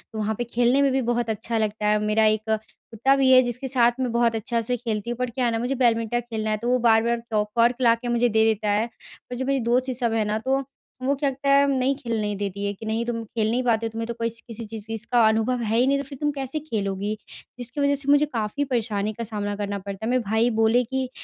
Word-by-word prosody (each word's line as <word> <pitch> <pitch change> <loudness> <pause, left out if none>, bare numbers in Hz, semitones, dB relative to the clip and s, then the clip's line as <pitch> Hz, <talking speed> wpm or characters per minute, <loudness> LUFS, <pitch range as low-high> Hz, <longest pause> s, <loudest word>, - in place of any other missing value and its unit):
वहाँ 215 0 -1
पे 240 - -1
खेलने 240 +3 +2
में 275 - +3
भी 265 0 +1
बहुत 240 -1 -1
अच्छा 220 +1 -2
लगता 215 -1 -1
है 210 0 +3
मेरा 215 +1 +3
1 215 0 +2
कुत्ता 220 +4 -1
भी 270 -1 +3
है 255 - +8
जिसके 245 +2 -3
साथ 240 -2 +4
मैं 255 -2 -1
बहुत 235 -1 +2
अच्छा 230 +2 -1
से 245 +2 -1
खेलती 225 -2 -3
हूँ 240 - -3
पर 250 0 -1
क्या 250 +2 -1
है 230 -1 +1
न - - -3
मुझे 250 +3 -1
बैडमिंटन 235 -2 +1
खेलना 220 -2 -4
है 215 - 0
तो 235 +3 -3
वो 250 - +4
बार-बार 230 0 +3
क 210 -1 +2
कॉर्क 235 +1 +4
ला 230 -2 +5
के 235 +1 -8
मुझे 240 0 +2
दे 220 0 +3
देता 215 -1 +1
है। 210 +2 +2 0.4
पर 250 - -5
जो 260 +2 -3
मेरी 275 0 +1
दोस्त 250 +3 +1
ये 255 - -1
सब 235 -2 0
है 225 -1 +1
न - - +1
तो 270 +1 +1 0.4
वो 270 +2 +2
क्या 280 0 0
त 265 - -7
है 280 0 +5
नहीं 270 0 +1
खेलने 220 -5 -2
देती 200 0 -4
है 200 - -1
कि 210 +3 -10
नहीं 220 +2 -1
तुम 230 -1 -3
खेल 220 0 -2
नहीं 250 +2 0
पाते 230 -2 +1
तुम्हें 225 0 -5
तो 235 - -3
कोई 230 0 -2
किसी 230 0 -6
चीज़ 215 -1 -7
चीज़ 225 - -9
इसका 235 +1 +2
अनुभव 225 +3 +1
है 220 +1 0
ही 250 +2 +4
नहीं 280 - +3
तो 280 - -3
फिर 275 0 -10
तुम 295 - +2
कैसे 275 +1 -4
खेलोगी। 205 -7 -3 0.5
जिसकी 250 +4 -3
वज़ह 280 0 +3
से 280 0 -3
मुझे 290 +1 +5
काफ़ी 235 0 -2
परेशानी 220 -5 -1
का 230 - -5
सामना 205 -2 -3
करना 200 -1 -3
पड़ता 200 +2 -6
है - - -1
मेरे 250 -1 +1
भाई 220 +3 +2
बोले 225 +3 +4
कि 260 +2 -3
235 Hz, 270 wpm, -24 LUFS, 220-255 Hz, 0.5 s, है